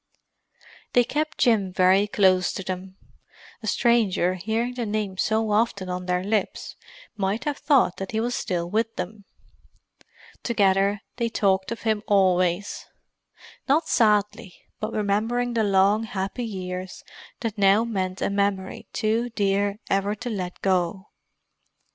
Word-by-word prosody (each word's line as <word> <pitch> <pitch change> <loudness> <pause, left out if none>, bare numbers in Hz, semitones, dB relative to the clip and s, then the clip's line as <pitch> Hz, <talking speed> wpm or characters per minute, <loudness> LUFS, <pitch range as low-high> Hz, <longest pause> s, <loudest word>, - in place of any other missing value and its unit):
They 245 - +5
kept 305 +5 -2
Jim 210 -6 +2
very 185 +2 +4
close 185 -3 +3
to 195 - -5
them. 185 +1 -6 0.6
A 220 - -6
stranger, 215 -7 +2
hearing 220 +6 -2
the 240 -3 -3
name 205 -2 -2
so 220 0 +1
often 205 -3 0
on 180 0 -4
their 180 0 0
lips, 205 0 -2 0.4
might 205 +3 -1
have 295 0 -2
thought 270 - +3
that 195 - -5
he 220 - -1
was 240 +2 -1
still 175 -6 -2
with 225 +4 -1
them. 205 +2 -6 1.2
Together, 200 -2 +2 0.2
they 235 -1 0
talked 190 -3 +1
of 230 - -5
him 220 -2 +1
always; 185 -1 +1 0.8
not 310 +4 +3
sadly, 210 -3 +1 0.2
but 215 +1 -3
remembering 225 +4 0
the 225 -1 +1
long, 200 +2 +3
happy 195 +3 -4
years 185 -3 -6 0.4
that 225 -4 -3
now 200 +2 +5
meant 190 -5 -3
a - - 0
memory 200 -1 -1
too 225 +2 0
dear 200 -2 0
ever 195 +1 0
to 245 +3 -5
let 180 -4 -5
go. 190 +1 0
205 Hz, 140 wpm, -24 LUFS, 190-225 Hz, 1.2 s, They